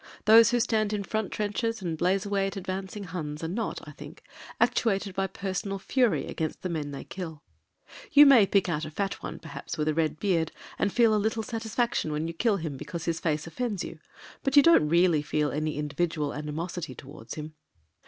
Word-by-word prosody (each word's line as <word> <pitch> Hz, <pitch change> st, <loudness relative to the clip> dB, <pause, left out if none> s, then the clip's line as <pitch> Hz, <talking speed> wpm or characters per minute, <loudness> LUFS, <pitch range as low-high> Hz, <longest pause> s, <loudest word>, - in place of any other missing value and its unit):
Those 225 Hz, +2 st, +8 dB
who 245 Hz, 0 st, +2 dB
stand 220 Hz, -3 st, +1 dB
in 205 Hz, -1 st, -1 dB
front 215 Hz, +1 st, -2 dB
trenches 215 Hz, +2 st, -2 dB
and 175 Hz, -4 st, -3 dB
blaze 185 Hz, +5 st, +1 dB
away 200 Hz, -1 st, 0 dB
at 195 Hz, -, -5 dB
advancing 190 Hz, +2 st, -5 dB
Huns 160 Hz, -4 st, -5 dB
are -, -, -1 dB
not, 210 Hz, +7 st, -4 dB
I -, -, -8 dB
think, -, -, -12 dB, 0.4 s
actuated 200 Hz, -3 st, +1 dB
by 195 Hz, +1 st, 0 dB
personal 195 Hz, +1 st, -3 dB
fury 200 Hz, -, +1 dB
against 155 Hz, -1 st, -4 dB
the 185 Hz, -, -2 dB
men 155 Hz, -4 st, -3 dB
they 140 Hz, -1 st, -6 dB
kill. 165 Hz, -5 st, -7 dB, 0.7 s
You 290 Hz, +1 st, +9 dB
may 250 Hz, -8 st, +7 dB
pick 195 Hz, -1 st, +2 dB
out 160 Hz, -3 st, -1 dB
a 155 Hz, -, -4 dB
fat 195 Hz, +5 st, -3 dB
one -, -, -6 dB
perhaps 165 Hz, +1 st, -7 dB
with 150 Hz, 0 st, -1 dB
a 155 Hz, -, +2 dB
red 155 Hz, -1 st, 0 dB
beard 170 Hz, -5 st, +1 dB, 0.3 s
and 200 Hz, -, +1 dB
feel 230 Hz, -1 st, +4 dB
a 210 Hz, -, +2 dB
little 220 Hz, +1 st, -1 dB
satisfaction 225 Hz, -5 st, -1 dB
when 150 Hz, +2 st, -2 dB
you 165 Hz, -, -4 dB
kill 210 Hz, +4 st, +1 dB
him 155 Hz, -5 st, -5 dB
because 170 Hz, +4 st, -6 dB
his 165 Hz, -1 st, -1 dB
face 155 Hz, -2 st, -1 dB
offends 205 Hz, +3 st, -3 dB
you, 165 Hz, -, -8 dB, 0.4 s
but 275 Hz, +1 st, +1 dB
you 285 Hz, -, +10 dB
don't 330 Hz, -, +5 dB
really 170 Hz, -2 st, +4 dB
feel 150 Hz, 0 st, 0 dB
any 155 Hz, +1 st, -2 dB
individual 150 Hz, 0 st, -1 dB
animosity 155 Hz, +3 st, -5 dB
towards 130 Hz, -5 st, -10 dB
him. 155 Hz, 0 st, -7 dB
185 Hz, 205 wpm, -28 LUFS, 155-210 Hz, 0.7 s, you